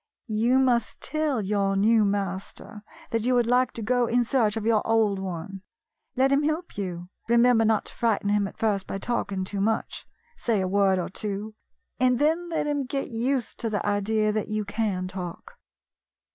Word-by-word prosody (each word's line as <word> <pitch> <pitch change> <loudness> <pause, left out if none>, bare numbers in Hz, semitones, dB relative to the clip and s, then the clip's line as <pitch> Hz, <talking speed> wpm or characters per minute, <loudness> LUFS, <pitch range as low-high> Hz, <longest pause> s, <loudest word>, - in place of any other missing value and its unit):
You 230 +3 +2
must 245 -4 +1
tell 305 -7 -1
your 195 0 0
new 215 +3 +4
master 200 +1 -3 0.3
that 225 -1 0
you 250 +1 +2
would 240 -1 +3
like 250 +2 +2
to 230 - -6
go 245 +2 +2
in 240 +1 +2
search 225 -4 +1
of 220 - -3
your 225 -2 +3
old 220 -3 +2
one. 190 +1 -6 0.5
Let 265 +1 +3
him 275 +1 +4
help 310 +4 -2
you. 180 -3 -5 0.2
Remember 235 -1 +5
not 220 -1 +2
to - - -10
frighten 225 -3 0
him 205 -1 +2
at - - -12
first 205 -3 0
by - - -3
talking 195 -3 -2
too 195 +1 -3
much. 220 +2 -2 0.3
Say 230 - 0
a 190 - 0
word 195 0 +3
or 180 - -2
two, 210 +1 -4 0.5
and 250 -1 +3
then 325 +5 +1
let 325 - -1
him 290 -2 -1
get 275 0 -3
used 245 +2 -1
to 230 - -1
the 210 -1 -2
idea 210 +1 +1
that 215 0 -2
you 215 0 -2
can 200 -3 -2
talk." 180 -2 -8
220 Hz, 185 wpm, -26 LUFS, 200-245 Hz, 0.5 s, Remember